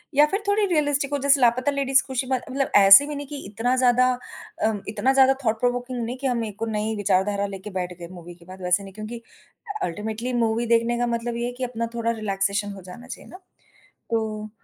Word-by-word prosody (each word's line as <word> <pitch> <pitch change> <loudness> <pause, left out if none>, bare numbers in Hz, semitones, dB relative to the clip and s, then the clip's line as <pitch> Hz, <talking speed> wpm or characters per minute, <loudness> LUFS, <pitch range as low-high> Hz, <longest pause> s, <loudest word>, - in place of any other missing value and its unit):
या 295 +1 +7
फिर 395 +2 -1
थोड़ी 410 +1 +3
रियलिस्टिक 290 -5 0
हो - - +2
जैसे 280 0 +3
लापता 250 +3 +3
लेडीज 270 -2 +2
खुशी 260 -1 -2
ब 265 - -1 0.2
मतलब 275 +1 -1
ऐसे 195 +6 +9
भी 300 - -5
नहीं 285 0 -6
कि 290 +1 -7
इतना 225 +5 0
ज़्यादा 255 0 +4 0.6
अम, 215 -2 0
इतना 220 +5 +1
ज़्यादा 265 0 +6
थॉट 220 0 +1
प्रोवोकिंग 245 0 -1
नहीं 245 +3 -5
कि 270 +1 -2
हम 240 -2 0
एक 210 -2 -8
को 225 - -1
नई 220 0 -2
विचारधारा 200 0 +1
लेके 195 +1 -8
बैठ 180 0 -4
गए 170 - -7
मूवी 175 -1 -11
के 170 0 -20
बाद 185 +1 -12
वैसे 180 +2 +1
नहीं, 195 -1 -11
क्योंकि 215 +3 -7 0.6
अल्टीमेटली 220 +7 -3
मूवी 225 +2 0
देखने 230 +1 +2
का 245 - +1
मतलब 235 0 -2
ये 235 - -2
है - - -3
कि 260 - -4
अपना 230 -2 -3
थोड़ा 230 0 0
रिलैक्सेशन 205 -2 -1
हो 195 - -10
जाना 210 +7 -11
चाहिए 260 - -9
ना। 365 - -10 0.7
तो 215 -1 -2
230 Hz, 220 wpm, -24 LUFS, 205-260 Hz, 0.7 s, ऐसे